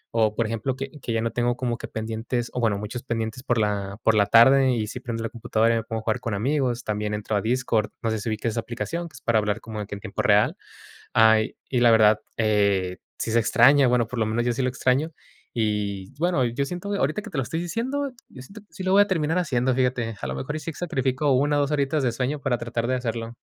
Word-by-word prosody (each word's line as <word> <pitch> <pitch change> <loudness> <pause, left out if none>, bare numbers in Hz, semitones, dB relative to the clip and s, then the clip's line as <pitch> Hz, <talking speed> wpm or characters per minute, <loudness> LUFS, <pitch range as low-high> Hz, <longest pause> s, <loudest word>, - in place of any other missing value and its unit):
O, 110 -2 +2
por 115 - +1
ejemplo, 115 +4 -2
que 135 +1 -6
que - - -4
ya 115 -1 0
no 115 - -1
tengo 120 0 0
como 120 -2 -1
que - - -6
pendientes, 115 +2 -3
o - - -2
bueno, 110 -4 +1
muchos 105 +4 -5
pendientes 115 -1 -3
por 120 -2 0
la 100 -2 -1
por 110 - +4
la 100 -1 +3
tarde 130 +4 +6
y 110 -2 -1
sí 125 - -6
prendo 115 -2 -4
la 115 - -2
computadora 115 0 +1
y 115 - +1
me 115 - -2
pongo 115 -1 -4
a - - -18
jugar 110 -1 0
con 110 -3 -3
amigos. 125 +1 0
También 105 0 -2
entro 105 0 -3
a 100 - +1
Discord, 115 -2 0
no 115 - 0
sé 110 - -1
si 110 - -4
ubiques 110 +1 -2
esa 115 - -2
aplicación 160 +9 -4
que - - -26
es - - -12
para 115 -2 +2
hablar 105 +1 -1
como 110 -1 -7
de 105 - -5
que 100 - -6
en 100 - -10
tiempo - - -4
real. - - +3 0.6
Ay, 110 -1 +4
y 125 - +1
la 120 -1 +6
verdad, 110 -1 +5 0.2
eh, 100 -4 +1 0.2
sí 115 - -3
se 115 - +4
extraña, 125 +4 +5
bueno, 120 -1 +2
por 125 +1 -5
lo 110 - +2
menos 115 +2 -1
yo 120 - +2
sí 120 +3 -2
lo 130 - +1
extraño. 130 +5 0 0.4
Y 105 -4 -2
bueno, 170 -5 +2
yo 125 +3 -1
siento 180 +6 -5
ahorita 155 0 0
que - - -9
te 160 - -6
lo 135 - +1
estoy 160 +7 -3
diciendo, 260 - -2 0.2
yo 130 - -12
siento 195 +12 -12
que 205 - -27
sí 190 - -7
lo 185 - 0
voy 200 - +7
a - - -8
terminar 165 -3 0
haciendo, 130 -6 +1
fíjate. 125 -3 0
A 65 - -3
lo 65 - -3
mejor 105 - -4
y - - -5
sí 160 +2 -6
sacrifico 135 -3 -1
1 145 +3 +2
o - - +3
2 140 +1 -1
horitas 145 0 0
de 125 - +2
sueño 135 +5 -2
para 125 -3 0
tratar 115 0 -3
de 130 - +1
hacerlo. 115 -1 -4
120 Hz, 265 wpm, -24 LUFS, 110-135 Hz, 0.6 s, voy